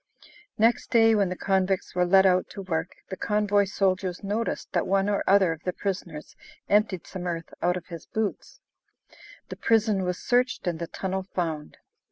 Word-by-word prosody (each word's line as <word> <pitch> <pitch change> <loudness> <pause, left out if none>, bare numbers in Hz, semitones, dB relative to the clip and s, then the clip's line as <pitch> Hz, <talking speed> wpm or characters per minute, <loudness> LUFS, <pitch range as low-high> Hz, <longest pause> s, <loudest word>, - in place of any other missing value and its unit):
Next 230 +2 +2
day, 225 -1 +5
when 200 -3 +2
the 180 - -3
convicts 190 0 0
were 180 0 +1
led 190 +1 +6
out 185 -1 +3
to 200 - -7
work, 165 -1 -3
the 190 - -4
convoy 205 0 +1
soldiers 190 -1 -1
noticed 210 +4 -3
that - - 0
one 195 0 +2
or 205 -1 0
other 195 -3 +5
of 160 -1 -6
the 180 - -3
prisoners 175 -6 -5 0.3
emptied 205 -4 +2
some 180 -1 -6
earth 165 -2 -5
out 180 +1 +1
of 175 - -8
his 170 -3 -9
boots. 220 -2 -4 0.9
The - - -7
prison 220 -3 +2
was 180 0 -2
searched 250 -2 0
and 170 -3 -2
the 170 - -4
tunnel 190 +2 -3
found. 160 -4 -3
190 Hz, 180 wpm, -26 LUFS, 180-205 Hz, 0.9 s, led